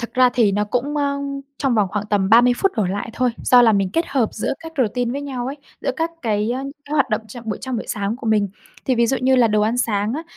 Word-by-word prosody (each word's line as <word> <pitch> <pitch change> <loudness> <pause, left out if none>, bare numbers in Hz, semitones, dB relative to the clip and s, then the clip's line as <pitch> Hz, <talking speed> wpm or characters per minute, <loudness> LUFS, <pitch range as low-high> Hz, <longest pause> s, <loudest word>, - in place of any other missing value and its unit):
Thật 235 - -6
ra 255 0 +5
thì 225 -5 +3
nó 205 +1 +1
cũng, 250 +7 -2
ơ, 280 -1 0 0.4
trong 270 -4 +1
vòng 210 -4 +2
khoảng 210 0 -3
tầm 195 -2 +2
30 240 +3 +6
phút 390 +6 +1
đổ 215 - +2
lại 200 +4 -3
thôi, 250 +1 +1
do 250 -1 +6
là 225 -2 +5
mình 195 -2 +1
kết 330 +5 0
hợp 245 -6 +1
giữa 215 - -2
các 325 0 -9
routine 245 0 0
với 280 +2 -4
nhau 260 -4 -4
ấy, 275 +2 -4 0.2
giữa - - -1
các 325 0 -1
cái 215 -1 0 0.3
các 290 - -9
hoạt 275 -4 +2
động 215 0 +1
chậm 235 +2 -10
buổi 215 - -3
trong 260 -2 -3
buổi 225 - -5
sáng 205 +2 -2
của 245 - -8
mình. 210 -2 +2 0.4
Thì 260 - +1
ví 235 -1 +3
dụ 265 - +1
như 260 +1 +3
là 240 -2 +5
đồ 210 0 +2
ăn 220 +3 +1
sáng 210 -3 0
á, 315 - -4
235 Hz, 280 wpm, -21 LUFS, 210-260 Hz, 0.4 s, 30